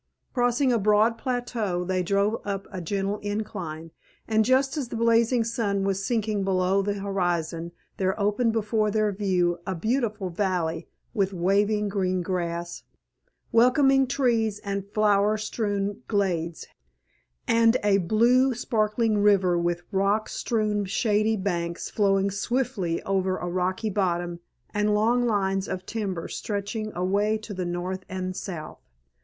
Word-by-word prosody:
Crossing 245 +1 +2
a 235 - +2
broad 215 +3 +3
plateau 240 -8 -2
they 185 0 0
drove 200 +4 +1
up 195 -1 -3
a 185 -2 -5
gentle 200 +4 -2
incline, 180 -6 -5 0.4
and 220 -1 +3
just 260 +4 +2
as 285 -5 -2
the 235 - -6
blazing 230 +1 +3
sun 215 -4 -1
was 195 0 -1
sinking 215 -3 0
below 190 0 +2
the 200 +1 -1
horizon 175 -4 -2 0.3
there 190 +2 0
opened 210 +3 +2
before 215 -1 0
their 215 0 +1
view 180 -3 0
a 190 - -1
beautiful 215 -1 -1
valley 170 -3 -1 0.3
with 200 -4 0
waving 205 +4 +1
green 185 -2 0
grass, 170 -1 -3 0.7
welcoming 270 +3 +4
trees 230 -6 +1
and 200 0 -3
flower 210 0 +3
strewn 205 -1 -2
glades, 175 -6 -1 0.8
and 230 0 +4
a 200 -1 +4
blue, 240 +7 +3
sparkling 220 -2 +1
river 195 -3 +4
with 175 0 -1
rock 200 +2 +1
strewn 215 -3 -1
shady 215 +2 +1
banks 170 -3 -3
flowing 195 -1 +2
swiftly 200 -5 -1
over 190 -1 0
a 175 - -4
rocky 185 +4 -1
bottom, 175 -3 -1 0.3
and 210 0 +2
long 240 +3 +2
lines 195 -3 0
of 185 0 -4
timber 195 -7 -3
stretching 215 +1 -4
away 200 +4 +1
to 215 -1 -8
the 185 -1 -3
north 180 +2 -3
and 185 0 -4
south. 170 -7 -6
200 Hz, 140 wpm, -26 LUFS, 185-220 Hz, 0.8 s, welcoming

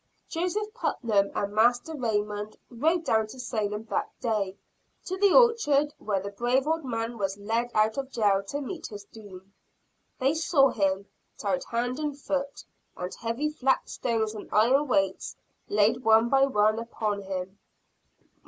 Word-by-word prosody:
Joseph 395 +6 -2
Putnam 215 - 0
and 200 0 -2
Master 240 +7 +2
Raymond 210 -4 -2
rode 320 +8 +1
down 220 -4 +2
to 255 +4 -11
Salem 215 -4 -2
that - - 0
day 210 -6 -1 0.5
to 375 - -3
the 395 0 +4
orchard 330 - +4
where 205 -2 -1
the 200 +1 -6
brave 245 +6 +1
old 320 +1 0
man 230 -2 -3
was 195 0 -1
led 225 +4 -1
out 215 +4 +2
of 270 -1 -4
jail 205 -6 +2
to 285 +7 -3
meet 315 +5 -6
his 205 -1 -9
doom. 200 -3 -13 0.6
They 270 +3 +2
saw 310 -4 +3
him, 195 -3 0 0.3
tied - - -1
hand 245 +3 -2
and 295 -2 -3
foot, 280 0 -3 0.3
and 180 +1 -5
heavy 235 +7 -2
flat 270 -3 +1
stones 220 -3 -1
and 215 - -9
iron 260 +7 +4
weights 195 -6 0 0.3
laid 210 +3 +3
one 225 +1 +5
by 270 +1 +4
one 215 -3 +2
upon 215 -3 -3
him. 190 0 -5
230 Hz, 155 wpm, -27 LUFS, 205-275 Hz, 0.6 s, one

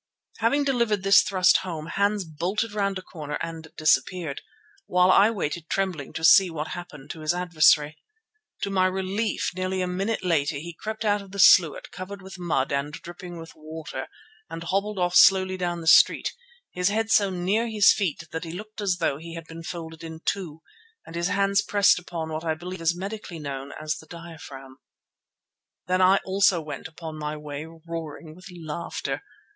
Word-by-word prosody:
Having 235 +6 +2
delivered 235 -7 +1
this 195 0 +7
home - - -1
thrust 185 -2 +5
Hans 190 +4 -1
bolted 180 +8 -2
round 200 -2 -1
a 185 - -8
corner 150 -5 -6
and 165 -1 -6
disappeared, 160 -1 +1 0.5
while 180 +1 +4
I 200 +3 +6
waited 170 -6 -3
trembling 185 -8 -2
to 160 - -5
see 190 +3 +7
what 160 -2 -4
happened 160 -6 -8
to 160 - -9
his 155 +2 0
adversary. 155 -3 +3 0.6
To 200 - -1
my 185 -1 +3
relief 190 +4 -1
nearly 185 +1 -2
a 185 - +1
minute 190 +4 -2
later 155 -4 +1
he 165 +5 -6
crept 215 +6 -5
out 205 -1 +2
of 200 - -13
the 200 - -9
sluit 175 -4 +5
covered 195 +2 -8
with 190 -1 -10
mud 155 -7 0
and 140 +1 -1
dripping 175 +2 -9
with 165 0 -10
water 155 -3 -7 0.4
and 165 +1 -6
hobbled 200 +4 -1
off 180 -1 0
slowly 185 -1 +6
down 175 -2 -2
the - - -8
street, 160 - +5 0.4
his 180 +1 +1
head 225 +2 -1
so 205 -3 +4
near 190 +6 0
his 215 -2 +5
feet 175 -6 -2
that 160 - -4
he 165 - -6
looked 215 +3 -8
as 190 -3 +1
though 140 -5 0
he 165 +1 -9
had 165 -1 -7
been 165 0 -9
folded 165 -1 -7
in 160 0 -8
two, 165 -5 -3 0.4
and 165 - -10
his 170 +1 0
hands 200 0 +2
pressed 205 -3 +4
upon 165 -2 -5
what 155 +1 -4
I 160 -1 0
believe 180 +2 -7
is 170 +1 +1
medically 195 -2 -6
known 140 -2 -6
as 155 -1 -2
the 160 - -14
diaphragm. 155 -6 -11 1.1
Then 185 +1 +1
I 185 +1 +6
also 195 -2 +3
went 150 -3 -7
upon 160 -1 -8
my 150 0 -4
way 150 0 -7
roaring 165 -1 -8
with 180 +3 -13
laughter. 165 0 -4
175 Hz, 185 wpm, -25 LUFS, 160-195 Hz, 1.1 s, this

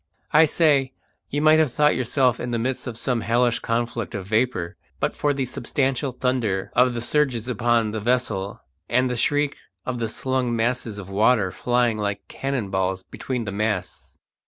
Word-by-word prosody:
I 155 +2 +7
say, 145 -4 +3 0.4
you 145 +2 -1
might 155 0 +6
have 155 -5 +2
thought 150 +3 +3
yourself 125 0 +1
in 120 - -4
the 120 - -1
midst 125 +3 -2
of 115 -2 -5
some 125 -1 -1
hellish 120 +1 +2
conflict 115 -2 -2
of 95 -2 -4
vapour 110 -5 0 0.2
but - - 0
for 145 - 0
the 135 -2 -1
substantial 135 +2 -1
thunder 120 -7 -1
of 125 0 +4
the 120 - -2
surges 130 -3 0
upon 120 -2 +1
the 110 0 -4
vessel 110 -4 -1 0.3
and 125 0 +2
the - - -1
shriek 145 +4 +1 0.3
of 125 -1 -3
the 115 -1 -1
slung 130 0 -1
masses 115 -2 -1
of 100 -1 -8
water 105 -1 +3
flying 120 -1 +1
like 100 -1 -3
cannon 135 -7 -3
balls 95 0 -1
between 125 -3 -3
the 100 - -4
masts. 105 -2 -3
120 Hz, 180 wpm, -23 LUFS, 110-130 Hz, 0.4 s, I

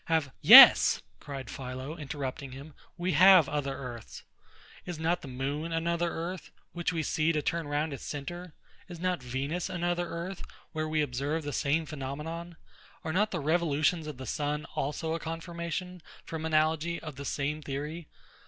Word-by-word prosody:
Have... 160 -4 0
Yes! - - +10 0.2
cried 140 -2 -7
PHILO, 130 +3 -6
interrupting 140 -3 -5
him, 140 +3 -10 0.2
we 180 +1 -1
have 180 -1 +7
other 140 -2 -2
earths. 120 -4 -8 0.6
Is 175 -2 -6
not 170 +3 0
the - - -9
moon 140 +5 -3
another 170 +1 0
earth, 170 +2 -5 0.2
which 175 0 -1
we 165 -2 -2
see 155 +2 +1
to 150 -2 -1
turn 170 -3 -1
round 145 +1 -1
its 135 - -8
centre? 170 +4 -6 0.3
Is 175 -2 -9
not 180 -4 -1
Venus 135 +9 -3
another 175 -1 -1
earth, 175 +3 -5 0.3
where 155 -1 -2
we 155 -1 +1
observe 145 +4 -2
the 145 -1 -4
same 155 +3 +1
phenomenon? 155 +4 -6 0.5
Are 160 - -3
not 210 +4 +2
the 180 - -3
revolutions 155 +1 +1
of 150 -4 -7
the 130 - -7
sun 150 0 -2
also 155 +3 -2
a 165 - -2
confirmation, 170 +2 -5 0.2
from 160 -1 -5
analogy, 160 +2 +1
of 155 -3 -8
the 140 - -7
same 145 +2 -2
theory? 150 +3 -5
155 Hz, 165 wpm, -29 LUFS, 145-170 Hz, 0.6 s, Yes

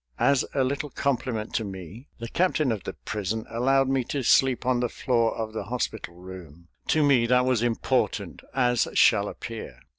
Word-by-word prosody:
As 130 +2 +3
a 135 - +3
little 140 +3 -2
compliment 125 -6 -2
to 115 - 0
me 95 - -9
the 115 - -6
captain 155 -2 +1
of 110 -3 -4
the - - -4
prison 110 +1 -4
allowed 135 +3 +2
me 135 -1 +1
to 140 +1 -3
sleep 130 +1 +3
on 125 -1 +2
the 120 -1 0
floor 115 -2 0
of 110 -1 -4
the 110 - -4
hospital 110 -6 -4
room. 85 -3 -12 0.2
To 155 - +3
me 130 -5 +4
that 125 +1 +3
was 130 -3 +2
important, 120 -1 -1
as 125 -3 +2
shall - - +5
appear. - - -7
120 Hz, 180 wpm, -26 LUFS, 110-135 Hz, 0.2 s, shall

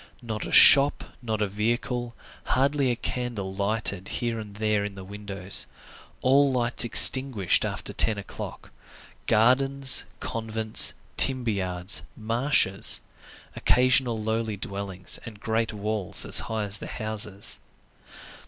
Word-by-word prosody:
Not 110 -2 -5
a - - -8
shop, 145 0 +6 0.2
not 110 -3 -3
a - - -1
vehicle, 120 +3 -3 0.3
hardly 140 +1 0
a 120 - 0
candle 115 -6 -5
lighted 100 -1 -2
here 120 -2 -3
and 105 -2 -10
there 105 -1 -1
in 100 -1 -6
the 95 - -10
windows; 100 -1 -4 0.6
all 140 +2 +3
lights 120 -1 +1
extinguished 120 -4 +7
after - - -5
ten 110 -2 +2
o'clock. 100 - -9 0.6
Gardens, 135 +4 +3
convents, 110 -1 -1 0.2
timber 130 -4 +3
yards, 90 -3 -2 0.2
marshes; 115 -3 +1 0.5
occasional 125 -2 +1
lowly 110 -1 -3
dwellings 100 -2 -5
and 110 -3 -11
great 110 +1 -2
walls 105 -2 -3
as - - +1
high 110 -1 -2
as 100 -1 -4
the - - -8
houses. 105 -2 -4
110 Hz, 125 wpm, -25 LUFS, 100-120 Hz, 0.6 s, extinguished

